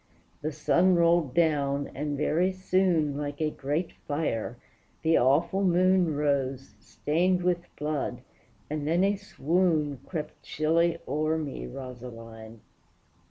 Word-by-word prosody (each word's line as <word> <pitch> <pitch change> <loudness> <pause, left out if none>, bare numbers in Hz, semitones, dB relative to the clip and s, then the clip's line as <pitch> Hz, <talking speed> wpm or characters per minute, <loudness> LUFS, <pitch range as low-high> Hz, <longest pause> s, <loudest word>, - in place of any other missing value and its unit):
The 155 - -2
sun 175 +5 +3
rolled 170 -5 +3
down, 145 -4 +1
and 145 0 -3
very 165 +5 +2
soon, 185 -5 +1
Like 145 0 -4
a 155 -1 0
great 150 +6 -2 0.2
fire, 145 -6 -2 0.5
the 160 0 +4
awful 145 +10 +2
moon 180 -2 +3
Rose, 135 -2 -1
stained 180 +4 0
with 175 -1 0
blood, 150 -1 -3 0.5
and 150 -1 -3
then 170 +4 +2
a 200 +1 +3
swoon 165 -6 0
Crept 155 -4 -5
chilly 165 +2 +1
o'er 155 +3 0
me, 140 - -5
Rosaline! 115 - -9
155 Hz, 120 wpm, -28 LUFS, 140-170 Hz, 0.5 s, the